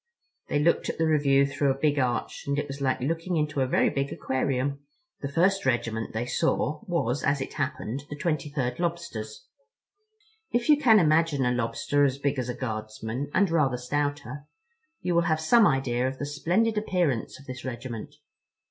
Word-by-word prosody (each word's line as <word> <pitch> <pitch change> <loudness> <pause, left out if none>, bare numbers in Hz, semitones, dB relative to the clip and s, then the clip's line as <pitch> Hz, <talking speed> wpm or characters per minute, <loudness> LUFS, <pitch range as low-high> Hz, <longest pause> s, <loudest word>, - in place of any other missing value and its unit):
They - - 0
looked 160 +4 +2
at - - -3
the 160 - +2
review 140 -3 +4
through 140 0 0
a 135 - +1
big 145 0 +1
arch, 120 -4 -1
and 140 0 0
it 145 0 -1
was 140 0 -7
like 130 -1 0
looking 165 +5 -1
into 150 -2 0
a 130 - +2
very - - +2
big 140 0 -2
aquarium. 130 +1 -1 0.4
The 140 - -5
first 190 +6 +2
regiment 115 -3 -1
they 110 +2 -2
saw 150 +2 0
was, 145 -7 0
as 140 0 +2
it 135 - -5
happened, 140 -2 -3
the 150 - -5
23rd 145 -5 -2
Lobsters. 170 -12 -4 1.0
If 240 +4 0
you 300 - +7
can 230 -6 +7
imagine 155 -5 +3
a 125 - +2
Lobster 125 +4 0
as 135 -1 +2
big 140 -1 -1
as 125 -1 -3
a 125 - -3
Guardsman, 110 +2 -4
and 190 0 +2
rather 140 -6 +2
stouter, 145 +1 -3 0.5
you 180 - -1
will 170 - +4
have 155 0 +2
some 215 +7 +5
idea 130 -2 +1
of 130 0 -4
the 145 - -3
splendid 180 +10 +1
appearance 175 - -1
of 140 - -15
this 130 -1 -7
regiment. 125 +2 -6
140 Hz, 185 wpm, -27 LUFS, 130-160 Hz, 1.0 s, you